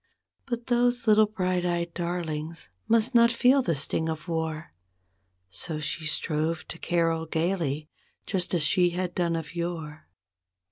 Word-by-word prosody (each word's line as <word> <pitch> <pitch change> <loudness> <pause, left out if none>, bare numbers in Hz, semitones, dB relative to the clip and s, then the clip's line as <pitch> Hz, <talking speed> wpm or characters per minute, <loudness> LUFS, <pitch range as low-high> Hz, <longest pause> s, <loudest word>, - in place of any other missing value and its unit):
But 240 -2 -3
those 245 -1 +2
little 215 -1 +6
bright 185 -4 -1
eyed 170 -1 -1
darlings 165 -2 -3 0.2
must 230 +3 +3
not 235 0 +6
feel 250 +4 +4
the 170 -10 0
sting 160 +3 +1
of 160 +2 -5
war; 160 -1 -3 0.8
So 155 - -4
she 155 +1 -2
strove 155 +2 -1
to 165 - -6
carol 165 -2 0
gaily, 160 -3 -1 0.4
just 185 -2 -1
as 165 - +1
she 180 +3 +4
had 180 -1 -2
done 170 -2 0
of 165 0 -5
yore. 165 -3 -5
170 Hz, 145 wpm, -27 LUFS, 160-195 Hz, 0.8 s, little